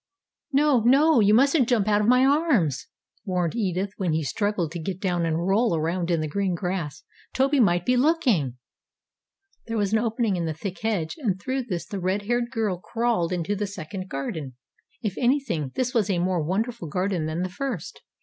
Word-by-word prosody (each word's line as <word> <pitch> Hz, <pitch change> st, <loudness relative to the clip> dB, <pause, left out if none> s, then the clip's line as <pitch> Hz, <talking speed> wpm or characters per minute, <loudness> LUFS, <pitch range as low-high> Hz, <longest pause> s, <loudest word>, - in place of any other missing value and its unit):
"No, 285 Hz, -2 st, +4 dB
no, 275 Hz, +5 st, +5 dB
you 205 Hz, -1 st, +5 dB
mustn't 275 Hz, 0 st, +4 dB
jump 220 Hz, -5 st, +2 dB
out 210 Hz, 0 st, +3 dB
of 210 Hz, -, 0 dB
my 250 Hz, +2 st, +5 dB
arms!" 270 Hz, -, +2 dB, 0.4 s
warned 180 Hz, -2 st, -1 dB
Edith 195 Hz, -3 st, -1 dB
when 180 Hz, -5 st, 0 dB
he 160 Hz, 0 st, 0 dB
struggled 200 Hz, 0 st, -1 dB
to 170 Hz, -, -5 dB
get 180 Hz, +3 st, -4 dB
down 175 Hz, -4 st, 0 dB
and 165 Hz, +1 st, -1 dB
roll 200 Hz, +1 st, +2 dB
around 170 Hz, +2 st, -1 dB
in 170 Hz, -2 st, +1 dB
the 155 Hz, -, -2 dB
green 190 Hz, +3 st, -1 dB
grass. 170 Hz, -5 st, -4 dB, 0.3 s
"Toby 275 Hz, +2 st, +2 dB
might 175 Hz, -6 st, +3 dB
be 250 Hz, -, +3 dB
looking." 245 Hz, -, +2 dB, 1.1 s
There 230 Hz, 0 st, -2 dB
was 205 Hz, -1 st, 0 dB
an 220 Hz, -, +4 dB
opening 225 Hz, -3 st, 0 dB
in 170 Hz, -, -1 dB
the 160 Hz, -1 st, -3 dB
thick 185 Hz, +4 st, -6 dB
hedge, 210 Hz, -, -1 dB
and 200 Hz, -10 st, -1 dB
through 260 Hz, +4 st, -2 dB
this 175 Hz, -7 st, -4 dB
the 200 Hz, -, -5 dB
red 190 Hz, +3 st, -1 dB
haired 240 Hz, +2 st, 0 dB
girl 220 Hz, -7 st, -1 dB
crawled 225 Hz, -5 st, -1 dB
into 180 Hz, +3 st, -1 dB
the 205 Hz, +1 st, -2 dB
second 190 Hz, 0 st, -7 dB
garden. 135 Hz, -2 st, -5 dB, 0.5 s
If 205 Hz, -4 st, -2 dB
anything, 240 Hz, -, 0 dB
this 255 Hz, 0 st, -1 dB
was 220 Hz, -5 st, +1 dB
a 190 Hz, -, +1 dB
more 180 Hz, 0 st, 0 dB
wonderful 215 Hz, +5 st, -2 dB
garden 180 Hz, 0 st, -1 dB
than 160 Hz, +3 st, -2 dB
the 185 Hz, -, -2 dB
first. 235 Hz, -, -5 dB
195 Hz, 195 wpm, -25 LUFS, 170-240 Hz, 1.1 s, no